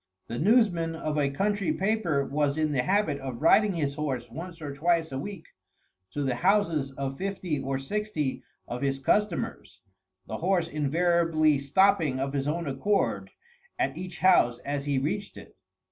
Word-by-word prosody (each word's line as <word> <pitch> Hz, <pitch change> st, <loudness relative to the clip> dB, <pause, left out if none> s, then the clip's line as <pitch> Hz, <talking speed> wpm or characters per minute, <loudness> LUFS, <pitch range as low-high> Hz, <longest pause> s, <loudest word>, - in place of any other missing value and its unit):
The 120 Hz, -, -5 dB
newsman 175 Hz, -5 st, +3 dB
of 155 Hz, -2 st, -3 dB
a 140 Hz, -1 st, +2 dB
country 200 Hz, +7 st, 0 dB
paper 190 Hz, -9 st, 0 dB
was 145 Hz, 0 st, 0 dB
in 155 Hz, -1 st, +1 dB
the 135 Hz, -4 st, +1 dB
habit 185 Hz, -2 st, +1 dB
of 130 Hz, -3 st, -6 dB
riding 200 Hz, +7 st, +5 dB
his 145 Hz, -5 st, -1 dB
horse 130 Hz, -6 st, -3 dB
once 165 Hz, +5 st, -8 dB
or 145 Hz, -3 st, -6 dB
twice 165 Hz, +2 st, +1 dB
a 135 Hz, -, -3 dB
week 180 Hz, +2 st, -7 dB, 0.6 s
to 145 Hz, +9 st, -3 dB
the 130 Hz, -3 st, -1 dB
houses 165 Hz, -7 st, +2 dB
of 135 Hz, 0 st, -4 dB
fifty 185 Hz, -6 st, -2 dB
or 135 Hz, 0 st, -2 dB
sixty 155 Hz, -2 st, -2 dB, 0.3 s
of 125 Hz, -, -5 dB
his 135 Hz, -1 st, 0 dB
customers, 190 Hz, +7 st, -1 dB, 0.4 s
the 110 Hz, -, -5 dB
horse 175 Hz, -, +1 dB
invariably 155 Hz, 0 st, +2 dB
stopping 155 Hz, -1 st, +3 dB
of 135 Hz, +1 st, -2 dB
his 140 Hz, 0 st, -1 dB
own 165 Hz, +3 st, -1 dB
accord 175 Hz, +9 st, 0 dB, 0.5 s
at -, -, 0 dB
each 185 Hz, 0 st, -7 dB
house 120 Hz, -10 st, +5 dB
as 140 Hz, 0 st, -2 dB
he 140 Hz, -2 st, 0 dB
reached 185 Hz, +10 st, -2 dB
it. -, -, -13 dB
155 Hz, 165 wpm, -27 LUFS, 140-185 Hz, 0.6 s, riding